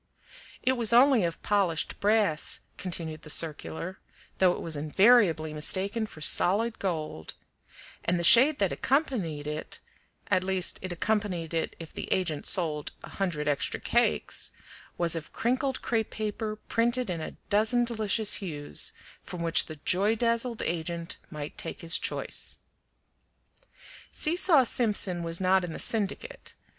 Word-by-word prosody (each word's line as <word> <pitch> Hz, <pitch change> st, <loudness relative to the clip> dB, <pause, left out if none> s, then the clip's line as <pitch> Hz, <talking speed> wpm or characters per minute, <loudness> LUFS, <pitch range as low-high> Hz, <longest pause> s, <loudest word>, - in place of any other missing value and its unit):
It 255 Hz, -, +3 dB
was 235 Hz, -3 st, +2 dB
only 250 Hz, -2 st, +6 dB
of 170 Hz, -1 st, -4 dB
polished 195 Hz, -6 st, 0 dB
brass, 205 Hz, -7 st, +1 dB
continued 165 Hz, -4 st, -5 dB
the 155 Hz, -, -11 dB
circular, 165 Hz, +4 st, -2 dB, 0.4 s
though 185 Hz, -1 st, +5 dB
it -, -, -6 dB
was 165 Hz, -2 st, -3 dB
invariably 160 Hz, 0 st, +3 dB
mistaken 195 Hz, +8 st, -1 dB
for 155 Hz, -, -13 dB
solid 215 Hz, +8 st, +3 dB
gold, 155 Hz, -, -4 dB, 0.7 s
and 175 Hz, +1 st, +1 dB
the -, -, -2 dB
shade 265 Hz, -, +7 dB
that 195 Hz, -3 st, +1 dB
accompanied 225 Hz, -, -1 dB
it 150 Hz, +1 st, -5 dB, 0.5 s
(at 185 Hz, -1 st, +3 dB
least 185 Hz, -1 st, 0 dB
it 185 Hz, -, -5 dB
accompanied 180 Hz, -3 st, -2 dB
it 165 Hz, -, -2 dB
if 165 Hz, -2 st, -10 dB
the -, -, -6 dB
agent 165 Hz, -6 st, 0 dB
sold 155 Hz, -5 st, -1 dB
a -, -, -9 dB
hundred 170 Hz, -7 st, -2 dB
extra 145 Hz, -2 st, 0 dB
cakes) -, -, 0 dB, 0.4 s
was 170 Hz, -1 st, +2 dB
of 160 Hz, -2 st, -6 dB
crinkled 260 Hz, +3 st, -1 dB
crepe 225 Hz, -2 st, 0 dB
paper 215 Hz, 0 st, -4 dB
printed 235 Hz, +3 st, 0 dB
in 175 Hz, -3 st, -3 dB
a -, -, -7 dB
dozen 220 Hz, +4 st, +3 dB
delicious 220 Hz, -2 st, +2 dB
hues, 150 Hz, -6 st, -2 dB, 0.3 s
from 175 Hz, -2 st, -7 dB
which 165 Hz, -1 st, +5 dB
the 155 Hz, -, -7 dB
joy 200 Hz, +5 st, +3 dB
dazzled 230 Hz, 0 st, -1 dB
agent 170 Hz, 0 st, -3 dB
might 150 Hz, -2 st, -7 dB
take -, -, -5 dB
his 165 Hz, 0 st, +1 dB
choice. -, -, -2 dB, 1.5 s
Seesaw 330 Hz, -3 st, +4 dB
Simpson 205 Hz, -7 st, 0 dB
was 165 Hz, 0 st, -2 dB
not 190 Hz, 0 st, +3 dB
in 170 Hz, -2 st, -5 dB
the -, -, -6 dB
syndicate. 225 Hz, -, -2 dB
190 Hz, 145 wpm, -28 LUFS, 165-225 Hz, 1.5 s, shade